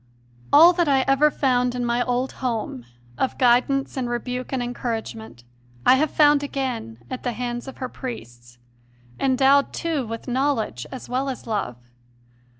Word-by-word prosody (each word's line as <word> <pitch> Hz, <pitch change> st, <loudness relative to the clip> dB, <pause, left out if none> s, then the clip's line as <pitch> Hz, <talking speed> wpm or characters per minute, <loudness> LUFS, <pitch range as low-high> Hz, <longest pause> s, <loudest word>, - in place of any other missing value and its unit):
All 330 Hz, +5 st, +8 dB
that 345 Hz, -2 st, +1 dB
I 270 Hz, -2 st, +4 dB
ever 275 Hz, +3 st, +3 dB
found 250 Hz, -3 st, +1 dB
in 245 Hz, -1 st, -2 dB
my 240 Hz, +1 st, +1 dB
old 250 Hz, +1 st, -1 dB
home, 225 Hz, -, -3 dB, 0.3 s
of 265 Hz, -, -1 dB
guidance 255 Hz, +2 st, +2 dB
and 255 Hz, -3 st, -2 dB
rebuke 250 Hz, +1 st, -4 dB
and 260 Hz, -2 st, -1 dB
encouragement, 225 Hz, -, -5 dB, 0.4 s
I -, -, +7 dB
have 310 Hz, +2 st, +1 dB
found 295 Hz, -1 st, +4 dB
again 260 Hz, -, -4 dB
at 255 Hz, -, -4 dB
the 245 Hz, -, -2 dB
hands 240 Hz, +1 st, -4 dB
of 265 Hz, -, -9 dB
her 255 Hz, -, -4 dB
priests, 120 Hz, -, -9 dB, 0.6 s
endowed, 270 Hz, +1 st, +3 dB
too, 315 Hz, -7 st, -2 dB
with 225 Hz, +3 st, -7 dB
knowledge 250 Hz, -, -1 dB
as 260 Hz, -, -8 dB
well 260 Hz, +2 st, -1 dB
as 260 Hz, -, -6 dB
love. 205 Hz, -, -3 dB
250 Hz, 155 wpm, -23 LUFS, 235-275 Hz, 0.6 s, All